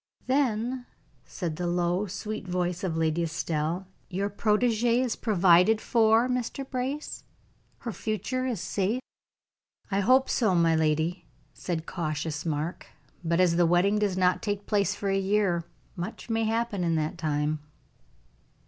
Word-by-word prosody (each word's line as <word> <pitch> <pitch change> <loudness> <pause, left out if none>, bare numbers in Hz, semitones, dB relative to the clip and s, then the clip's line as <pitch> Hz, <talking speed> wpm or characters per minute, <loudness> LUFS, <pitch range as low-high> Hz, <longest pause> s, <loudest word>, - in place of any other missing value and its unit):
"Then," 250 -2 0 0.4
said 165 -5 -4
the 175 0 -2
low, 175 +3 0
sweet 205 +1 -5
voice 180 +1 -1
of 170 -4 -1
Lady 160 +1 +1
Estelle, 165 +2 -2 0.2
"your 200 +2 -2
protegee 230 +3 +2
is 255 -3 0
provided 190 0 +4
for, 225 +1 +3
Mr. 250 +2 -2
Brace? 270 +4 -4 0.6
Her 235 - -4
future 245 +5 -2
is 240 -7 -2
safe?" 200 +7 -1 0.9
"I 195 - +2
hope 255 +6 +4
so, 215 -7 +2
my 165 -1 +4
lady," 160 +3 0 0.3
said 165 -3 -4
cautious 155 -1 -3
Mark. 155 +2 -3 0.4
"But 170 +1 +1
as 175 -2 +4
the 175 -1 +4
wedding 185 +5 +3
does 200 -3 0
not 180 -1 +2
take 205 -1 -3
place 200 -1 +1
for 200 - -3
a 195 - +2
year, 190 -4 +1 0.3
much 180 +6 -6
may 225 0 +1
happen 225 -3 -1
in 165 -1 +1
that 155 +2 -2
time." 150 -1 0
190 Hz, 145 wpm, -27 LUFS, 170-220 Hz, 0.9 s, provided